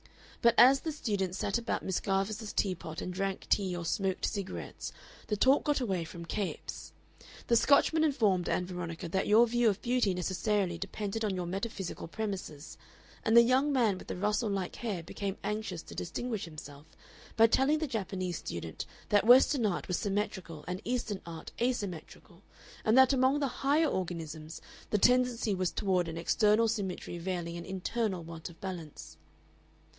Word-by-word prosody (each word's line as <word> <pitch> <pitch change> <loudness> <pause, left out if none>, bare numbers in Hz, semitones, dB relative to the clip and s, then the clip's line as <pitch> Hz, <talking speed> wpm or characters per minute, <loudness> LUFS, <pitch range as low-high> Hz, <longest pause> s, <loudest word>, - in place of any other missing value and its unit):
But 235 0 +5
as 265 +2 +8
the 320 - -3
students 200 - -2
sat 200 +3 0
about 235 - -2
Miss 190 - 0
Garvice's 205 +2 -1
tea 195 -3 +1
pot 165 -2 -8
and 180 - -4
drank 195 +1 -3
tea 190 -3 +2
or 170 - -5
smoked 190 +2 0
cigarettes, 200 -3 -5 0.4
the 210 - -1
talk 265 +7 +4
got 295 -2 +1
away 190 -9 -1
from 170 +1 -8
Capes. 200 +3 -4 0.5
The 235 - +3
Scotchman 285 +6 +4
informed 215 - +2
Ann 180 - 0
Veronica 175 -2 -5
that 190 +3 0
your 220 +3 +6
view 240 0 +3
of 200 -1 -1
beauty 240 -6 +2
necessarily 185 0 0
depended 205 +3 -4
on 205 -3 0
your 180 -1 -2
metaphysical 195 0 -4
premises, 185 -6 -5 0.4
and 225 +1 +4
the 235 - +10
young 260 +4 +3
man 225 -8 +2
with - - -12
the - - -4
Russell 210 +4 0
like 195 -3 -3
hair 205 -8 -3
became 195 +3 -4
anxious 210 -5 -3
to - - -11
distinguish 225 +4 -3
himself 150 -2 -11 0.5
by 225 - +8
telling 265 +6 +3
the 315 - -1
Japanese 190 - -3
student 85 -1 -6 0.2
that 205 +1 +3
Western 250 -1 +6
art 180 - -2
was 180 - 0
symmetrical 195 -6 -3
and 180 +2 -4
Eastern 235 -5 -2
art 165 -1 -8
asymmetrical, 205 -10 -3 0.4
and 220 +2 +3
that 265 +1 +7
among 265 +2 +3
the 280 - +1
higher 290 +4 +3
organisms 165 - -4 0.3
the 210 - +2
tendency 245 -1 +3
was 185 -2 0
toward 185 -4 0
an 165 0 -5
external 210 +6 +3
symmetry 195 -5 -3
veiling 170 -1 -3
an 170 - -7
internal 190 0 -2
want 165 0 -8
of 165 -1 -15
balance. 175 -6 -7
200 Hz, 170 wpm, -31 LUFS, 180-235 Hz, 0.5 s, the